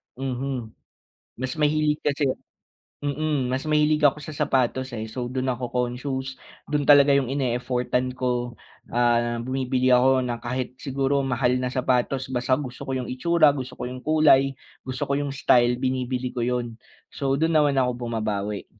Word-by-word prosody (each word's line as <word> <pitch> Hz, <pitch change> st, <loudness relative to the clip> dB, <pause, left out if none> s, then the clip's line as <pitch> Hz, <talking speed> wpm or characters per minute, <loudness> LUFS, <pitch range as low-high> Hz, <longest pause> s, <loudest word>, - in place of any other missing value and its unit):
mhm. 130 Hz, -3 st, -4 dB, 0.7 s
Mas 130 Hz, 0 st, -3 dB
mahilig 150 Hz, 0 st, +1 dB
kasi 145 Hz, 0 st, 0 dB, 0.8 s
mm 145 Hz, -1 st, -1 dB
mas 130 Hz, +1 st, -1 dB
mahilig 150 Hz, 0 st, +3 dB
ako 145 Hz, 0 st, +4 dB
sa 155 Hz, -, -7 dB
sapatos 130 Hz, -3 st, 0 dB
eh, 110 Hz, 0 st, -4 dB
so 125 Hz, 0 st, -4 dB
dun 130 Hz, +1 st, -1 dB
ako 125 Hz, 0 st, -4 dB
conscious, 130 Hz, +2 st, -3 dB, 0.3 s
dun 145 Hz, -1 st, -1 dB
talaga 145 Hz, -1 st, +7 dB
yung 140 Hz, -3 st, +2 dB
ine-effort-an 125 Hz, -1 st, -1 dB
ko, 125 Hz, -1 st, -2 dB, 0.4 s
ah, 120 Hz, -1 st, +2 dB
bumibili 130 Hz, 0 st, 0 dB
ako 130 Hz, +1 st, +4 dB
na 120 Hz, -1 st, -3 dB
kahit 125 Hz, +1 st, -3 dB
siguro 135 Hz, 0 st, 0 dB
mahal 125 Hz, -1 st, +1 dB
na 125 Hz, -, -1 dB
sapatos 130 Hz, +1 st, 0 dB
basta 130 Hz, +1 st, +1 dB
gusto 130 Hz, -3 st, -7 dB
ko 130 Hz, -, -2 dB
yung 125 Hz, -1 st, -4 dB
itsura, 155 Hz, +3 st, +4 dB
gusto 130 Hz, -2 st, -6 dB
ko -, -, -6 dB
yung 125 Hz, +1 st, -6 dB
kulay, 135 Hz, -4 st, +4 dB, 0.3 s
gusto 130 Hz, 0 st, -4 dB
ko 140 Hz, -, -1 dB
yung 145 Hz, -1 st, -2 dB
style, 120 Hz, -2 st, +4 dB
binibili 130 Hz, -1 st, -2 dB
ko 125 Hz, -, -5 dB
yun. 120 Hz, -1 st, -1 dB, 0.4 s
So 135 Hz, -1 st, -1 dB
dun 160 Hz, +2 st, +1 dB
naman 145 Hz, -2 st, +2 dB
ako 125 Hz, -2 st, 0 dB
bumabawi. 105 Hz, -3 st, -3 dB
130 Hz, 160 wpm, -24 LUFS, 125-140 Hz, 0.8 s, talaga